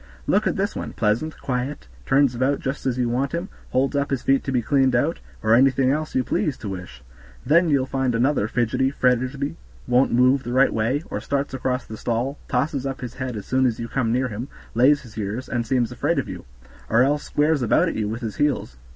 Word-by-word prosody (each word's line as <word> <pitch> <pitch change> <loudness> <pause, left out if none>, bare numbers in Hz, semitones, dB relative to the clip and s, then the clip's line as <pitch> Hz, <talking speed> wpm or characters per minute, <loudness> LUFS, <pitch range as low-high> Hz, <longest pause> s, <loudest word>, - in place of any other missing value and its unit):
Look - - +2
at - - 0
this - - -1
one, - - -5
pleasant, 115 +10 0
quiet, 125 - -3 0.2
turns 135 -2 +4
about 130 +4 +1
just 135 0 -3
as 125 -1 0
you 125 -1 +1
want 130 +5 -1
him, 170 +3 -3 0.2
holds 135 +3 +1
up 140 0 0
his 135 -3 -2
feet 135 0 +3
to 135 - -2
be 125 -2 +1
cleaned 130 +1 +3
out, 145 +8 +1 0.2
or 110 +1 +4
anything 130 +1 +4
else 155 +2 -2
you 130 - +2
please 145 +2 -1
to 105 - -6
wish; 90 -9 -8 0.4
then 170 +2 +4
you'll 140 -3 +2
find 130 -2 -1
another 120 -2 +2
fidgety, 120 +3 +1
fretty, 130 +4 0 0.3
won't 125 +2 +3
move 130 +3 +4
the 120 -2 -5
right 135 +2 +4
way, 120 +7 0
or - - -3
starts 140 0 -2
across 130 0 -2
the 110 - -8
stall, 120 +6 -2
tosses 140 +1 -1
up 135 -1 -5
his 125 -1 -6
head 130 -3 -4
as 105 - -7
soon 130 0 +2
as 115 - -2
you 115 - -4
come 115 -1 -1
near 130 +2 +1
him, 115 +4 -5 0.3
lays 135 +5 +4
his 115 -3 -10
ears, 110 +5 -3
and 120 -2 -2
seems 125 -2 +1
afraid - - 0
of - - -1
you; - - -8 0.4
or 115 +3 +5
else 145 +2 +1
squares 150 0 +1
about 120 - +3
at - - -1
you 105 -1 -1
with 115 +3 -4
his 110 -3 -5
heels. 145 - 0
130 Hz, 230 wpm, -23 LUFS, 120-140 Hz, 0.4 s, or